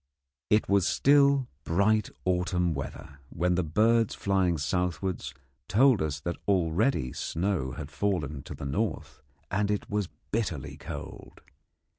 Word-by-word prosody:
It 105 +1 +3
was 100 -2 +3
still 140 -2 +4 0.2
bright 100 +5 +2 0.2
autumn 90 -1 +1
weather, 70 +1 -7
when 90 +5 0
the 90 +1 +1
birds 110 +7 +2
flying 95 -4 +1
southwards 90 +1 -2 0.4
told 125 +3 +4
us 75 -2 -2
that 85 +3 -3
already 90 - +1
snow 85 -7 -2
had - - -7
fallen 80 -9 -1
to - - -7
the - - -7
north, 70 - -3 0.3
and 100 +1 +1
it 105 0 -2
was 105 -3 -1 0.2
bitterly 90 - -2
cold. - - -9
90 Hz, 130 wpm, -28 LUFS, 80-105 Hz, 0.4 s, still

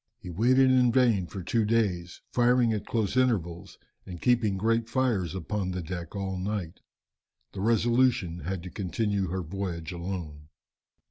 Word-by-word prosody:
He 90 - -9
waited 130 +8 +4
in 125 -2 +4
vain 115 -7 +3
for 95 +3 -7
two 115 +6 +1
days, 100 -6 0
firing 120 -1 +3
at 105 - -4
close 110 -2 -1
intervals 95 -10 0 0.3
and 90 -2 -9
keeping 115 -4 +2
great 115 +3 +1
fires 110 - 0
upon 95 +2 -3
the 90 -1 -3
deck 85 +1 -6
all 95 -1 -3
night. 95 -3 -4 0.7
The 95 - -6
Resolution 115 -5 +2
had 90 +2 -4
to 90 - -8
continue 100 +1 -1
her 90 +2 -3
voyage 85 -1 -4
alone. 85 -4 -6
100 Hz, 150 wpm, -28 LUFS, 90-115 Hz, 0.7 s, waited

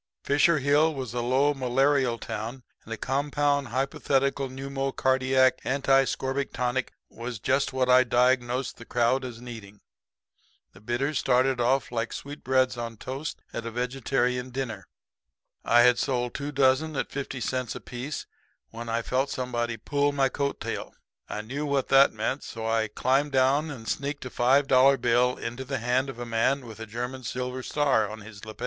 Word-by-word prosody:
Fisher 145 +3 +4
Hill 145 +3 +3
was 130 -4 -5
a 120 - -1
low, 130 +4 +2
malarial 135 -1 +2
town; 115 +3 -6 0.2
and 115 - -13
a 115 - -3
compound 140 +2 0
hypothetical 135 +1 0
pneumocardiac 130 -1 +1
anti 135 0 +3
scorbutic 135 +1 -2
tonic 125 +1 -1 0.2
was 120 0 -6
just 135 +6 +1
what 130 -1 0
I 125 0 +6
diagnosed 125 +1 +1
the 115 - -11
crowd 120 +3 +1
as 120 -3 -7
needing. 110 -4 -10 0.9
The 95 - -16
bitters 125 +7 -1
started 130 0 +2
off 130 +2 +1
like 115 -1 -2
sweetbreads 130 -3 -1
on 115 -1 -5
toast 135 +6 -6
at 115 0 -4
a - - -2
vegetarian 125 +1 -1
dinner. 125 -7 -5 0.8
I 120 +1 +5
had 125 0 +5
sold 125 -2 -1
two 145 0 -4
dozen 140 +3 +2
at 135 - -2
fifty 135 -1 -4
cents 125 0 -2
apiece 130 +4 -6 0.5
when 115 0 -7
I 115 +1 -1
felt 130 +4 0
somebody 120 -2 -2
pull 145 +5 0
my 135 -1 +2
coat 140 +1 -2
tail. - - -5 0.3
I 105 - -3
knew 135 +7 -4
what 140 -3 0
that 135 0 +6
meant; 110 +6 -2
so 115 -1 -6
I 115 0 +1
climbed 135 +7 0
down 135 +4 +3
and 120 -6 -8
sneaked 140 0 -3
a 130 - -6
five 135 +4 +3
dollar 135 +1 +5
bill 125 +1 +2
into 120 +3 -5
the 130 +1 -3
hand 125 +3 0
of 135 - -7
a 120 - -5
man 120 +4 +1
with 115 -1 -10
a 110 - -7
German 125 +4 -5
silver 125 +1 -4
star 135 -7 +1
on 110 0 -8
his 105 -1 -12
lapel. 110 -1 -10
130 Hz, 170 wpm, -27 LUFS, 120-135 Hz, 0.9 s, I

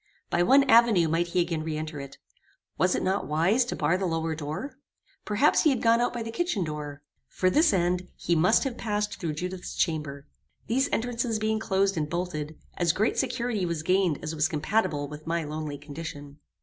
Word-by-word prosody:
By 175 - +2
one 270 +11 +6
avenue 230 -9 +5
might 165 +2 +1
he 175 +1 +1
again 170 -2 -2
re 155 -1 -3
enter. 155 -3 -5 0.7
Was 180 +3 +2
it - - -1
not 190 +2 0
wise 170 +11 +3
to - - -4
bar 165 +4 +1
the 190 - 0
lower 165 -1 -1
door? 160 - -6 0.5
Perhaps 215 +8 +3
he 310 - +4
had 260 -5 0
gone 230 0 +4
out 245 - +1
by 240 -2 -4
the 225 - -5
kitchen 345 - -1
door. 150 -2 -6 0.2
For 185 0 0
this 315 - +4
end, 180 -1 0
he 170 - 0
must 180 +8 +4
have 260 -4 -4
passed 210 -1 -2
through 165 -4 -2
Judith's 180 +3 -5
chamber. 150 -4 -2 0.4
These 265 +4 +1
entrances 230 -1 -1
being 215 0 0
closed 195 -3 +1
and 150 -1 -1
bolted, 160 -3 -4 0.2
as 170 -3 +2
great 215 +6 +1
security 240 -5 -1
was 170 -3 -2
gained 180 -3 +2
as 155 +1 -3
was 155 -1 +2
compatible 155 -3 0
with 150 +2 -10
my 170 0 0
lonely 150 -1 -5
condition. 145 -1 -8
175 Hz, 195 wpm, -27 LUFS, 155-220 Hz, 0.7 s, one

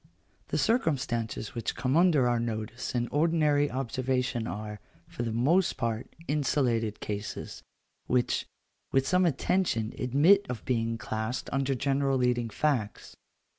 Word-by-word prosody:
The - - -1
circumstances 130 - 0
which 115 - -3
come 130 +4 0
under 165 -7 +4
our 120 -1 +2
notice 115 +2 -4
in 120 0 0
ordinary 150 -2 +2
observation 130 -1 -1
are, 105 0 -5 0.3
for - - -6
the 115 -1 -1
most 150 +11 +2
part, 115 -2 -2 0.2
insulated 125 -7 0
cases, 105 0 -5 0.5
which, 125 0 +1 0.4
with 135 0 +2
some 180 0 +3
attention, 140 - 0
admit 160 +11 +4
of 125 - -5
being 115 -2 0
classed 110 +2 -4
under 135 0 +1
general 135 +1 +1
leading 125 -2 +1
facts. 120 -5 -1
125 Hz, 130 wpm, -29 LUFS, 115-145 Hz, 0.5 s, under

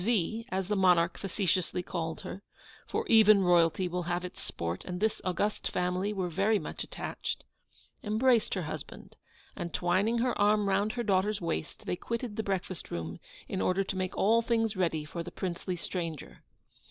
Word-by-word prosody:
V., 225 +1 0
as 190 -1 -1
the 210 - +1
monarch 180 -3 +4
facetiously 185 -2 0
called 165 -2 -3
her 195 - -7 0.5
(for - - -1
even 215 -3 +7
royalty 175 0 +4
will 180 +1 -2
have 175 +1 -1
its 180 - -8
sport, 85 +1 -3
and 180 -1 -5
this 220 +1 0
august 190 +3 0
family 180 +3 0
were 190 -3 -1
very 195 +6 +2
much - - -5
attached), - - -4 0.6
embraced 230 +2 +3
her 185 - -1
husband, 155 - -7 0.4
and, 170 -2 -4
twining 190 +6 +2
her 245 +1 +1
arm 210 0 +4
round 200 +2 +2
her 240 - -2
daughter's 205 0 +2
waist, 165 -2 -4
they - - -1
quitted 235 +3 -4
the 220 - 0
breakfast 190 -3 -3
room 80 -1 -4 0.3
in 95 - -2
order 185 - +2
to 195 - -4
make 185 -1 -2
all 225 +3 +4
things 225 -2 +1
ready 165 -5 0
for 170 +2 -5
the 170 - -6
princely 180 0 -3
stranger. 170 -3 -5
185 Hz, 175 wpm, -30 LUFS, 175-210 Hz, 0.6 s, even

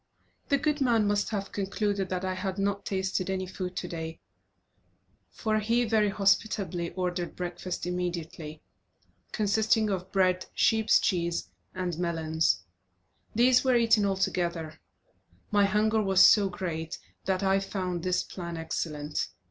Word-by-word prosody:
The 280 - +4
good 300 0 0
man 235 -5 +3
must 205 0 +1
have 200 -3 -3
concluded 200 -1 -1
that 185 0 -2
I 185 - -1
had 190 +1 -3
not 200 0 -1
tasted 190 -1 -1
any 190 -1 -1
food 185 0 -5
today, 165 -2 -5 1.1
for 215 -2 -1
he 230 +3 +1
very 215 -2 +2
hospitably 195 -3 +1
ordered 180 -1 -3
breakfast 180 0 -4
immediately, 170 -3 -4 0.7
consisting 215 0 +2
of 185 0 -3
bread, 185 -1 +2
sheep's 220 -1 +4
cheese, 170 -2 -1 0.2
and 180 -3 -3
melons. 160 - 0 0.7
These 245 +2 +5
were 260 -2 +3
eaten 230 -3 +4
all 195 -1 +1
together. 170 -4 -2 0.7
My 205 -1 +4
hunger 215 +2 +2
was 195 -2 +5
so 200 -2 +6
great 165 -3 -4 0.3
that 190 0 0
I 195 0 +3
found 185 -3 -3
this 180 +1 0
plan 170 -2 -6
excellent. 150 -2 -3
190 Hz, 135 wpm, -28 LUFS, 175-210 Hz, 1.1 s, so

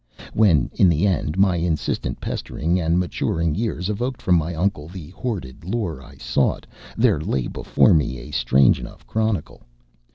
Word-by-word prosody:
When, 90 - +3
in 95 - +4
the 85 +3 +2
end, 90 -4 0
my 95 -2 +3
insistent 85 -2 -2
pestering 85 +5 -2
and 85 0 +1
maturing 85 -2 -1
years 95 -2 -2
evoked 120 +5 -2
from 90 - +1
my 85 0 +1
uncle 80 -3 -1
the 85 -2 -9
hoarded 90 - -5
lore 90 - -3
I 65 - -14
sought, - - 0 0.3
there - - +3
lay 65 -2 -1
before - - +2
me 75 -5 +1
a - - -10
strange 65 +2 +3
enough - - -10
chronicle. 110 -7 -2
85 Hz, 160 wpm, -22 LUFS, 75-100 Hz, 0.3 s, in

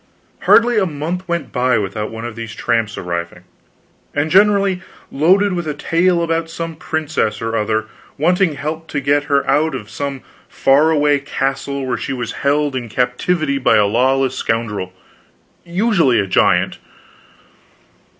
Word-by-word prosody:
Hardly 235 -1 +5
a 190 - +1
month 170 +4 -4
went 170 -4 -3
by 125 0 +2
without 105 +1 -3
one 115 +1 -7
of 120 -2 -6
these 115 -1 -7
tramps 115 -2 -1
arriving; 85 0 -5 0.7
and 150 +2 0
generally 200 -1 +4 0.3
loaded 185 +7 +3
with 175 -2 -3
a 150 - -2
tale 170 +3 +1
about 165 0 -1
some 165 0 -5
princess 155 -7 -2
or 115 0 -3
other 110 0 0 0.3
wanting 175 +1 +2
help 155 +3 -5
to 145 - -2
get 145 +1 +1
her 140 -1 +1
out 155 +2 +2
of 105 - -8
some 140 -2 -4 0.3
far 145 +4 +3
away 145 -2 +3
castle 135 0 -3
where 125 -2 -1
she 135 - -4
was 120 -3 -4
held 145 0 +1
in 120 -3 -4
captivity 140 +5 0
by 135 - +3
a 105 - +4
lawless 130 +5 +2
scoundrel, 115 -6 -2 0.7
usually 175 - +2
a 100 - +1
giant. 95 - +2
140 Hz, 150 wpm, -18 LUFS, 120-165 Hz, 0.7 s, Hardly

